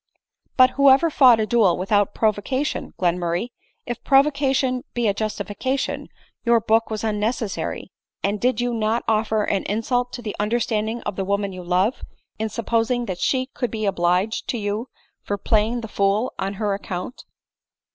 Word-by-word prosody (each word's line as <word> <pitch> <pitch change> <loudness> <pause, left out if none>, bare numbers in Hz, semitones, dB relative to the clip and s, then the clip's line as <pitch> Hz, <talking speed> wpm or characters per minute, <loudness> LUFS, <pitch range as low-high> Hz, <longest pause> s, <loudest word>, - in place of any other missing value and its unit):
"But 255 0 +7
whoever 280 +3 +5
fought 250 -6 +6
a 215 - +1
duel 215 -6 +3
without 200 +2 +1
provocation, 225 +7 -1
Glenmurray? 175 +4 0 0.4
If 240 -1 -5
provocation 270 -2 +2
be 240 -2 +1
a 200 - +2
justification, 215 +5 -3 0.4
your 235 -1 +4
book 225 +1 +2
was 215 0 -4
unnecessary; 215 0 -2 0.3
and 205 +1 -1
did 250 -1 +1
not 230 -1 0
you 225 - +1
offer 215 0 +1
an 195 -1 0
insult 245 +4 -1
to 245 - -6
the 210 - -4
understanding 220 +1 -1
of 190 - -4
the 195 - -1
woman 200 0 -1
you 185 -1 -8
love, 185 +7 +1 0.4
in 220 0 -1
supposing 230 +2 0
that 185 -5 -5
she 260 -1 +1
could 245 - -2
be 215 -1 -3
obliged 185 +3 0
to 245 - -1
you 210 +3 -3 0.3
for 205 - -3
playing 220 +4 +1
the 225 - -6
fool 200 +3 0
on 195 +1 -2
her 205 0 -1
account 195 +3 -6
220 Hz, 160 wpm, -22 LUFS, 205-245 Hz, 0.4 s, But